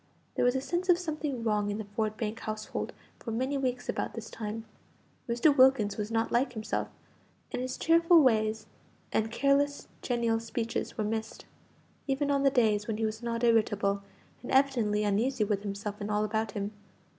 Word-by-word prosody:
There -, -, 0 dB
was 245 Hz, +1 st, +3 dB
a 265 Hz, -, 0 dB
sense 350 Hz, +6 st, -2 dB
of 350 Hz, -, +7 dB
something 305 Hz, -7 st, -3 dB
wrong 210 Hz, -2 st, +1 dB
in 205 Hz, -, -2 dB
the 220 Hz, -, -5 dB
Ford 215 Hz, +1 st, -2 dB
Bank 220 Hz, 0 st, -3 dB
household 215 Hz, 0 st, -4 dB, 0.3 s
for -, -, -7 dB
many 260 Hz, +5 st, -1 dB
weeks 255 Hz, -2 st, -2 dB
about -, -, -2 dB
this 225 Hz, -1 st, -7 dB
time. 220 Hz, 0 st, -5 dB, 0.6 s
Mr. 245 Hz, +5 st, +4 dB
Wilkins 255 Hz, -7 st, +5 dB
was 210 Hz, 0 st, -3 dB
not 225 Hz, 0 st, 0 dB
like 250 Hz, +2 st, +1 dB
himself, 220 Hz, -1 st, -2 dB, 0.6 s
and -, -, -2 dB
his 255 Hz, 0 st, -3 dB
cheerful 335 Hz, 0 st, +5 dB
ways 220 Hz, -3 st, +2 dB, 0.5 s
and 220 Hz, 0 st, +1 dB
careless 280 Hz, +3 st, +1 dB
genial 235 Hz, -2 st, +1 dB
speeches 230 Hz, 0 st, -3 dB
were 215 Hz, -, 0 dB
missed, 220 Hz, +1 st, -4 dB, 0.6 s
even 280 Hz, +1 st, 0 dB
on 280 Hz, -1 st, +2 dB
the 275 Hz, -, +5 dB
days 220 Hz, -6 st, +2 dB
when 220 Hz, -2 st, -2 dB
he 225 Hz, -, 0 dB
was 220 Hz, +1 st, -3 dB
not 235 Hz, 0 st, -2 dB
irritable, 210 Hz, -4 st, +2 dB, 0.4 s
and 245 Hz, -, -7 dB
evidently 240 Hz, -6 st, +3 dB
uneasy 215 Hz, +4 st, +1 dB
with 205 Hz, -1 st, 0 dB
himself 205 Hz, +1 st, -5 dB
and 205 Hz, -, -3 dB
all 210 Hz, 0 st, +1 dB
about 220 Hz, -1 st, -1 dB
him. 205 Hz, 0 st, -3 dB
225 Hz, 180 wpm, -30 LUFS, 215-265 Hz, 0.6 s, of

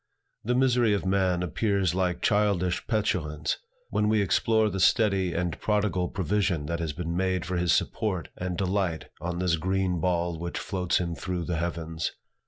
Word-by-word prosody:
The 125 Hz, +3 st, 0 dB
misery 125 Hz, -4 st, +3 dB
of 100 Hz, -, -3 dB
man 95 Hz, -2 st, +2 dB
appears 95 Hz, 0 st, +1 dB
like 90 Hz, -1 st, -1 dB
childish 100 Hz, -4 st, +1 dB
petulance, 90 Hz, -9 st, -1 dB, 0.3 s
when 105 Hz, -, +2 dB
we 110 Hz, 0 st, +3 dB
explore 110 Hz, +3 st, +3 dB
the 95 Hz, -2 st, -2 dB
steady 95 Hz, -2 st, +3 dB
and 85 Hz, -1 st, -2 dB
prodigal 100 Hz, -4 st, +1 dB
provision 95 Hz, -4 st, 0 dB
that 85 Hz, +2 st, -2 dB
has 80 Hz, -2 st, -2 dB
been 85 Hz, +2 st, -4 dB
made 95 Hz, -1 st, 0 dB
for 90 Hz, 0 st, -3 dB
his 85 Hz, 0 st, +2 dB
support 95 Hz, -7 st, 0 dB
and 90 Hz, -1 st, -3 dB
delight 95 Hz, -4 st, -1 dB
on 85 Hz, 0 st, -3 dB
this 90 Hz, -2 st, +1 dB
green 95 Hz, +1 st, 0 dB
ball 85 Hz, -1 st, 0 dB
which 85 Hz, 0 st, -4 dB
floats 90 Hz, -3 st, 0 dB
him 85 Hz, -1 st, -1 dB
through 85 Hz, +3 st, -3 dB
the 85 Hz, -2 st, -1 dB
heavens. 80 Hz, -1 st, -3 dB
90 Hz, 170 wpm, -27 LUFS, 85-100 Hz, 0.3 s, misery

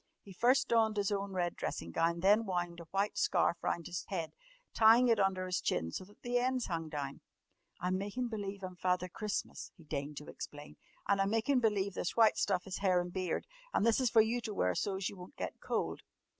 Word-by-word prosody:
He 195 Hz, -, -12 dB
first 255 Hz, +7 st, +3 dB
donned 220 Hz, -2 st, +3 dB
his 205 Hz, 0 st, +1 dB
own 200 Hz, -1 st, -2 dB
red 175 Hz, -2 st, -1 dB
dressing 85 Hz, -, -4 dB
gown 165 Hz, -, +2 dB
and 170 Hz, -, -7 dB
then 210 Hz, +3 st, +5 dB
wound 175 Hz, -2 st, -2 dB
a 170 Hz, -, -9 dB
white 195 Hz, +5 st, -1 dB
scarf 170 Hz, -, +2 dB
round 170 Hz, -, -1 dB
his 175 Hz, 0 st, -4 dB
head, 170 Hz, -5 st, -3 dB, 0.4 s
tying 230 Hz, +3 st, +6 dB
it 225 Hz, -2 st, +4 dB
under 190 Hz, -1 st, +1 dB
his 185 Hz, 0 st, -1 dB
chin 80 Hz, +1 st, -1 dB
so -, -, -5 dB
that 205 Hz, +2 st, -21 dB
the 245 Hz, 0 st, +1 dB
ends 255 Hz, 0 st, 0 dB
hung 165 Hz, -3 st, -3 dB
down. 145 Hz, -2 st, -5 dB, 0.6 s
"I'm 185 Hz, +1 st, 0 dB
makin' 205 Hz, +5 st, -2 dB
believe 200 Hz, -3 st, -5 dB
I'm 185 Hz, -1 st, -6 dB
Father 180 Hz, 0 st, +1 dB
Christmas," 210 Hz, +3 st, -4 dB
he 165 Hz, -, -15 dB
deigned 145 Hz, -1 st, -4 dB
to 150 Hz, -, -6 dB
explain. 145 Hz, 0 st, -9 dB, 0.3 s
"An' 200 Hz, -1 st, +3 dB
I'm 195 Hz, 0 st, +2 dB
makin' 225 Hz, +5 st, +2 dB
believe 205 Hz, -4 st, +1 dB
this 175 Hz, -, -3 dB
white 225 Hz, -2 st, +6 dB
stuff 185 Hz, -3 st, +1 dB
is 190 Hz, -2 st, -5 dB
hair 185 Hz, -2 st, +3 dB
an' 175 Hz, 0 st, -2 dB
beard. 185 Hz, -1 st, -2 dB, 0.3 s
An' -, -, +3 dB
this 230 Hz, +2 st, +4 dB
is 255 Hz, -2 st, +2 dB
for 225 Hz, 0 st, +6 dB
you 230 Hz, +3 st, 0 dB
to 215 Hz, -3 st, -5 dB
wear 90 Hz, -, +2 dB
so's 195 Hz, -, -1 dB
you 200 Hz, -, -6 dB
won't 180 Hz, 0 st, -11 dB
get -, -, -5 dB
cold." -, -, -2 dB
195 Hz, 225 wpm, -33 LUFS, 175-220 Hz, 0.6 s, tying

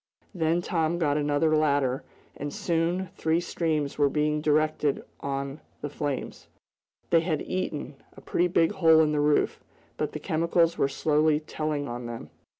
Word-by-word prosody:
Then 170 Hz, -1 st, +1 dB
Tom 165 Hz, -2 st, 0 dB
got 150 Hz, -4 st, +1 dB
another 150 Hz, +1 st, +2 dB
ladder, 140 Hz, -4 st, +1 dB, 0.3 s
and 145 Hz, +1 st, -5 dB
soon 170 Hz, +3 st, -1 dB
three 160 Hz, -2 st, +1 dB
streams 155 Hz, -5 st, -2 dB
were 145 Hz, -1 st, +4 dB
being 150 Hz, +1 st, 0 dB
directed 150 Hz, -1 st, +1 dB, 0.2 s
on 140 Hz, +1 st, -4 dB, 0.2 s
the 145 Hz, -, -4 dB
flames. 145 Hz, -3 st, -4 dB, 0.6 s
They 165 Hz, -, +6 dB
had 160 Hz, -3 st, -1 dB
eaten, 150 Hz, -6 st, -4 dB, 0.2 s
a -, -, -11 dB
pretty 175 Hz, -, +1 dB
big 170 Hz, -1 st, +3 dB
hole 160 Hz, -5 st, +5 dB
in 155 Hz, -1 st, +2 dB
the 150 Hz, -, 0 dB
roof, 150 Hz, 0 st, +2 dB, 0.4 s
but -, -, -2 dB
the -, -, -4 dB
chemicals 165 Hz, +1 st, +1 dB
were 140 Hz, -, +1 dB
slowly 150 Hz, +2 st, +2 dB
telling 155 Hz, -2 st, -3 dB
on 120 Hz, -1 st, -5 dB
them. 115 Hz, -1 st, -8 dB
155 Hz, 155 wpm, -27 LUFS, 145-165 Hz, 0.6 s, They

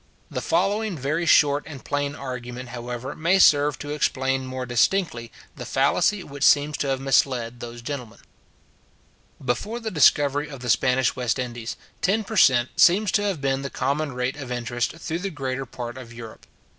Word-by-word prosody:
The -, -, -3 dB
following 210 Hz, -2 st, 0 dB
very 150 Hz, +5 st, -1 dB
short 145 Hz, -2 st, +5 dB
and 145 Hz, -5 st, -10 dB
plain 145 Hz, 0 st, -2 dB
argument, 125 Hz, -2 st, -7 dB
however, 120 Hz, +2 st, -6 dB
may 170 Hz, +4 st, +2 dB
serve 145 Hz, -5 st, +5 dB
to 145 Hz, -, -6 dB
explain 135 Hz, -3 st, 0 dB
more 130 Hz, 0 st, -4 dB
distinctly 120 Hz, 0 st, 0 dB, 0.2 s
the 125 Hz, -, -7 dB
fallacy 145 Hz, +10 st, +1 dB
which 140 Hz, -2 st, -7 dB
seems 145 Hz, +1 st, +4 dB
to 145 Hz, -, -2 dB
have 135 Hz, -1 st, 0 dB
misled 125 Hz, -3 st, +1 dB
those 120 Hz, 0 st, -8 dB
gentlemen. 125 Hz, -4 st, -6 dB, 1.3 s
Before 205 Hz, -, -2 dB
the 225 Hz, -2 st, -4 dB
discovery 145 Hz, -2 st, +3 dB
of 140 Hz, -3 st, -9 dB
the 125 Hz, -2 st, +1 dB
Spanish 130 Hz, +1 st, +2 dB
West 125 Hz, -3 st, -1 dB
Indies, 120 Hz, -2 st, -5 dB, 0.2 s
ten 215 Hz, +4 st, +1 dB
per 220 Hz, +2 st, -7 dB
cent. 130 Hz, -, +5 dB
seems 195 Hz, +3 st, +5 dB
to 205 Hz, -, +2 dB
have 195 Hz, -8 st, -2 dB
been 135 Hz, -1 st, 0 dB
the 140 Hz, -, -4 dB
common 140 Hz, +3 st, -1 dB
rate 125 Hz, +2 st, -2 dB
of 135 Hz, -3 st, -7 dB
interest 120 Hz, -1 st, -2 dB
through 165 Hz, +1 st, -4 dB
the 195 Hz, +2 st, -3 dB
greater 135 Hz, -4 st, -4 dB
part 120 Hz, +1 st, -7 dB
of 120 Hz, -2 st, -11 dB
Europe. 115 Hz, -1 st, -11 dB
135 Hz, 175 wpm, -24 LUFS, 125-150 Hz, 1.3 s, short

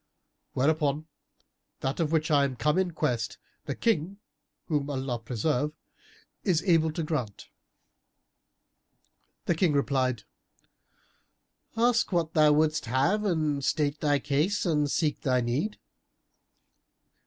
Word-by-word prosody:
Wherefore, 150 Hz, +2 st, +1 dB, 0.8 s
that 135 Hz, +4 st, -2 dB
of 160 Hz, -2 st, 0 dB
which 160 Hz, -1 st, +1 dB
I 145 Hz, -1 st, +5 dB
am 135 Hz, -2 st, -1 dB
come 150 Hz, +7 st, +1 dB
in 190 Hz, -1 st, +1 dB
quest, 125 Hz, -8 st, -2 dB, 0.3 s
the 140 Hz, -, -3 dB
King 195 Hz, -4 st, 0 dB, 0.5 s
(whom 145 Hz, -3 st, -1 dB
Allah 130 Hz, -3 st, -2 dB
preserve!) 125 Hz, +6 st, -1 dB, 0.7 s
is 180 Hz, -5 st, +1 dB
able 165 Hz, -4 st, +3 dB
to 165 Hz, -, -2 dB
grant." 130 Hz, -10 st, -4 dB, 2.0 s
The -, -, +2 dB
King 165 Hz, -1 st, +2 dB
replied, 130 Hz, -4 st, 0 dB, 1.5 s
"Ask 235 Hz, -1 st, +2 dB
what 170 Hz, -3 st, 0 dB
thou 155 Hz, -1 st, +5 dB
wouldst 155 Hz, +1 st, +2 dB
have, 140 Hz, -, +1 dB
and 155 Hz, -7 st, 0 dB
state 145 Hz, +1 st, 0 dB
thy 145 Hz, -1 st, +2 dB
case 150 Hz, +10 st, 0 dB
and 150 Hz, -4 st, +1 dB
seek 150 Hz, 0 st, 0 dB
thy 130 Hz, -2 st, +2 dB
need." 130 Hz, -, -1 dB
150 Hz, 120 wpm, -28 LUFS, 140-165 Hz, 2.0 s, I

